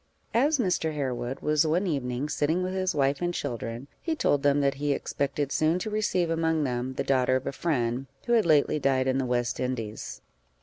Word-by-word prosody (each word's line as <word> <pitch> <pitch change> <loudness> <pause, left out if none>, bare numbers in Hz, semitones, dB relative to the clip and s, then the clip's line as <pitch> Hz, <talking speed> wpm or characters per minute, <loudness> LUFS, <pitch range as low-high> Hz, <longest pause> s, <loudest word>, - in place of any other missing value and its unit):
As 285 +6 +3
Mr. 180 - 0
Harewood 130 -2 -3
was 150 0 +3
one 165 +5 +1
evening 135 -4 -2
sitting 160 +4 0
with 185 0 -2
his 185 -2 0
wife 140 +1 +1
and 175 0 0
children, 120 -4 -4
he 325 -2 -1
told 145 - +2
them 145 0 +3
that 140 -1 +2
he 145 -1 +2
expected 140 0 -2
soon 155 +4 +2
to 210 +4 -4
receive 185 -5 0
among 160 -1 +1
them 125 0 -2
the - - -1
daughter 130 -1 +2
of 130 - -1
a - - -1
friend, 130 -4 -1 0.2
who 240 - +1
had 225 -6 +4
lately 150 -1 +3
died 135 -2 +2
in 130 0 +1
the 135 - 0
West 120 0 -1
Indies. 115 - -4
145 Hz, 205 wpm, -27 LUFS, 130-170 Hz, 0.2 s, had